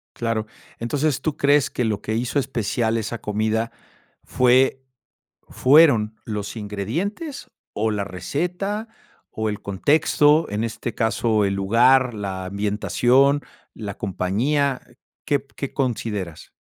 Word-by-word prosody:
Claro. 115 Hz, -2 st, -1 dB, 0.3 s
Entonces, 140 Hz, +4 st, 0 dB
¿tú 155 Hz, -3 st, -2 dB
crees 145 Hz, 0 st, +3 dB
que 125 Hz, -, -2 dB
lo 105 Hz, -2 st, -1 dB
que 110 Hz, -, -3 dB
hizo 125 Hz, +5 st, 0 dB
especial 115 Hz, -2 st, -1 dB
esa 115 Hz, +1 st, -4 dB
comida 110 Hz, +2 st, -1 dB, 0.5 s
fue 130 Hz, +1 st, +3 dB, 0.7 s
fueron 130 Hz, -7 st, +4 dB
los 105 Hz, 0 st, -5 dB
ingredientes 160 Hz, -, -4 dB, 0.2 s
o 110 Hz, +1 st, 0 dB
la 100 Hz, -1 st, -1 dB
receta, 180 Hz, -, -3 dB, 0.5 s
o 110 Hz, 0 st, 0 dB
el 105 Hz, -, -5 dB
contexto, 150 Hz, -, +3 dB
en 105 Hz, +2 st, -1 dB
este 115 Hz, +1 st, -4 dB
caso 110 Hz, -1 st, +1 dB
el 100 Hz, 0 st, 0 dB
lugar, 120 Hz, +6 st, +4 dB
la 95 Hz, -3 st, -4 dB
ambientación, 120 Hz, +8 st, +2 dB, 0.3 s
la 100 Hz, -3 st, -6 dB
compañía? 125 Hz, +9 st, 0 dB, 0.4 s
¿Qué 140 Hz, -2 st, 0 dB
qué 140 Hz, -, -4 dB
consideras? 105 Hz, -, -3 dB
115 Hz, 120 wpm, -22 LUFS, 105-140 Hz, 0.7 s, fueron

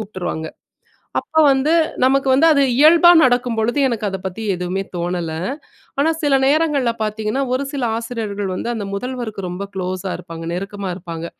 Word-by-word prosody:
கூப்டுருவாங்க. 180 Hz, -6 st, -5 dB, 0.7 s
அப்ப 315 Hz, -, +1 dB
வந்து 270 Hz, +3 st, +1 dB, 0.3 s
நமக்கு 270 Hz, +1 st, +3 dB, 0.3 s
அது 280 Hz, -, +3 dB, 0.2 s
இயல்பா 335 Hz, +3 st, +7 dB
நடக்கும் 245 Hz, -1 st, +2 dB
பொழுது 235 Hz, +6 st, 0 dB
எனக்கு 230 Hz, -4 st, -2 dB
அத 195 Hz, -, -4 dB
பத்தி 190 Hz, +4 st, -5 dB
எதுவுமே 180 Hz, +2 st, -3 dB
தோணல. 175 Hz, -1 st, -2 dB, 0.7 s
ஆனா 295 Hz, +3 st, +3 dB
சில 285 Hz, -2 st, +3 dB
நேரங்கள்ல 285 Hz, -4 st, +2 dB
பாத்தீங்கன்னா, 215 Hz, +4 st, -2 dB
ஒரு 260 Hz, -, 0 dB
சில 280 Hz, -3 st, -3 dB
ஆசிரியர்கள் 220 Hz, -4 st, -4 dB
வந்து 235 Hz, -, -4 dB
அந்த 215 Hz, -3 st, -4 dB
முதல்வருக்கு 235 Hz, -1 st, -4 dB
ரொம்ப 180 Hz, +2 st, -5 dB
க்ளோஸ்ஸா 185 Hz, 0 st, -3 dB
இருப்பாங்க, 165 Hz, -2 st, -9 dB
நெருக்கமா 195 Hz, +1 st, -4 dB
இருப்பாங்க. 170 Hz, -2 st, -7 dB
215 Hz, 145 wpm, -19 LUFS, 185-265 Hz, 0.7 s, இயல்பா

